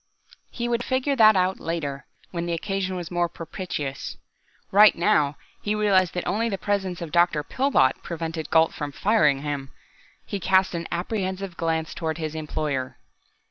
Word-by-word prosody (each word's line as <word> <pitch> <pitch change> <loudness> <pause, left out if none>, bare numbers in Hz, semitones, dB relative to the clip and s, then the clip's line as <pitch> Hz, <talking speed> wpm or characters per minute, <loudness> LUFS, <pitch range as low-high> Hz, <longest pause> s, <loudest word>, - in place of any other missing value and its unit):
He 240 -1 -3
would 240 0 0
figure 260 +2 0
that 220 -4 +7
out 185 0 +1
later, 145 -5 -4 0.2
when 170 -1 -3
the 170 - -1
occasion 190 +2 -2
was 175 -2 -5
more 175 -1 +1
propitious. 160 -5 -5 0.5
Right 210 +2 +7
now, 150 -4 +2 0.3
he 210 0 -1
realized 195 -4 +3
that 180 - -2
only 230 +4 0
the 195 - -2
presence 190 -4 -2
of 160 - -7
Dr. 170 -3 +3
Pillbot 260 - +2
prevented 160 -2 -5
Gault 160 -1 +4
from 145 -1 -4
firing 150 -7 +2
him. 145 -2 -3 0.6
He 200 - -4
cast 190 +1 +3
an 170 -1 -3
apprehensive 190 0 -3
glance 160 -2 -1
toward 160 -1 -3
his 155 -2 -4
employer. 150 -4 -3
175 Hz, 160 wpm, -25 LUFS, 155-195 Hz, 0.6 s, that